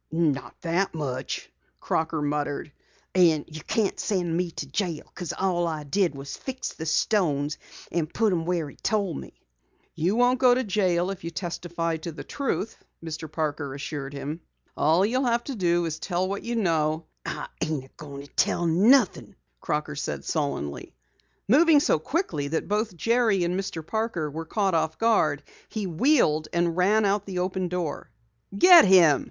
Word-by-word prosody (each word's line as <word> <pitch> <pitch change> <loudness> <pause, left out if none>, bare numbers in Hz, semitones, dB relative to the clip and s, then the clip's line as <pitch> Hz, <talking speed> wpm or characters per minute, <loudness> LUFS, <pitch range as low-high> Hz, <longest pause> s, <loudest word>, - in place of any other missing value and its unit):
"Not 145 -7 0
that 175 +2 0
much," 140 -5 -4 0.3
Crocker 160 -1 -1
muttered. 145 0 -2 0.4
"An' 165 -5 +4
you 155 -1 -9
can't 210 +3 -1
send 175 -5 0
me 175 0 0
to 155 - -6
jail 160 +2 -2
because 180 -4 -5
all 175 -3 0
I 155 -2 -3
did 170 +2 +1
was 135 0 -7
fix 260 -1 -5
the 160 - -6
stones 150 -5 +1 0.3
and 165 -1 -1
put 220 -3 +2
'em 165 -2 -1
where 170 -3 -1
he 140 - -13
told 200 -7 -1
me." - - -14 0.5
"You 180 +6 0
won't 245 +1 +3
go 250 -2 +6
to 260 - 0
jail 185 -4 +1
if 195 - -8
you 170 - -3
testify 170 -1 -3
to 165 +2 -6
the 155 - -8
truth," 265 -6 -3 0.3
Mr. 160 -1 -6
Parker 150 -3 -2
assured 140 -1 -5
him. 150 +4 -5 0.3
"All 165 +6 +3
you'll 255 +5 +1
have 235 0 +1
to 275 - -5
do 175 -3 +1
is 160 -1 -3
tell 180 0 -1
what 200 +1 -3
you 235 0 -3
know 160 -6 +1
" - - -48
"I - - -4 0.2
ain't 150 -5 -4
going 140 -2 -9
to 145 - -20
tell 175 - +1
nothing," 205 +7 +3 0.2
Crocker 150 - -2
said 145 - -4
sullenly. 140 - -3 0.5
Moving 300 +6 +6
so 280 - +2
quickly 160 - -2
that 160 +3 -2
both 210 -2 -1
Jerry 225 -3 +2
and 175 +1 0
Mr. 180 -4 -4
Parker 220 -8 -2
were 165 +2 -5
caught 195 +2 0
off 160 -1 0
guard, 185 -11 +2 0.3
he 215 -2 -3
wheeled 170 - +2
and 170 -1 +1
ran 205 +4 +3
out 200 +1 +1
the 190 -2 -4
open 185 0 -1
door. 175 -4 -4 0.5
"Get 355 - +9
him!" 170 -8 +6
170 Hz, 175 wpm, -26 LUFS, 155-200 Hz, 0.5 s, Get